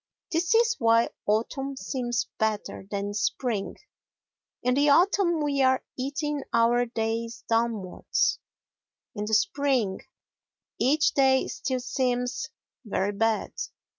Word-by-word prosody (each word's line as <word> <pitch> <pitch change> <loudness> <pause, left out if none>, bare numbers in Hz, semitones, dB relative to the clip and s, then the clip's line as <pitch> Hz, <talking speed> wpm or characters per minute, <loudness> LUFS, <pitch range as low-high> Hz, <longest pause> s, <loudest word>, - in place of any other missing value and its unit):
This 340 +6 +1
is 460 0 +3
why 230 -1 +4 0.2
autumn 265 +6 -1
seems 240 +1 -2
better 215 -3 -2
than 200 0 -3
spring: 215 0 -1 0.9
in 250 +1 +2
the 285 +2 +3
autumn 345 +1 +3
we 280 -2 +1
are 260 0 +3
eating 290 +2 -2
our 240 +1 +3
days 230 0 -3
downwards, 225 -5 0 0.7
in 210 - -4
the 220 +1 +2
spring 245 -3 +1 0.8
each 295 +6 +3
day 265 -1 +3
still 260 -2 -3
seems 250 0 -1 0.3
"Very 205 -3 -1
bad." 225 +1 0
245 Hz, 110 wpm, -27 LUFS, 220-275 Hz, 0.9 s, why